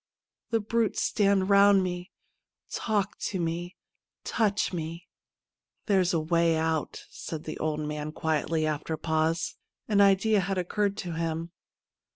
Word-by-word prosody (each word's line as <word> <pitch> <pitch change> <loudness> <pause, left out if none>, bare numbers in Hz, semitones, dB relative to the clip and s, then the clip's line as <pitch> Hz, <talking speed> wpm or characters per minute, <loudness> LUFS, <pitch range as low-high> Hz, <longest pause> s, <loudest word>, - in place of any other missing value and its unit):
The 230 - +2
brutes 225 +1 0
stand 200 -2 +2
round 200 -1 +6
me, 180 0 -4 0.6
talk 205 -3 -1
to 190 - -2
me, 170 +2 -3 0.5
touch 210 -4 0
me 165 +1 -5 0.4
!' - - -56
'There's 190 -4 +3
a 165 - +2
way 165 +1 +2
out/ 160 -1 -1
said 160 -1 -6
the 155 - -6
old 155 -1 -1
man 150 0 -4
quietly, 160 0 0
after 155 +1 -2
a - - -12
pause. 160 +1 0 0.3
An 205 -2 +4
idea 200 +2 +4
had 195 0 -1
occurred 200 +3 0
to 175 - -4
him. 165 0 -3
175 Hz, 145 wpm, -28 LUFS, 160-200 Hz, 0.6 s, round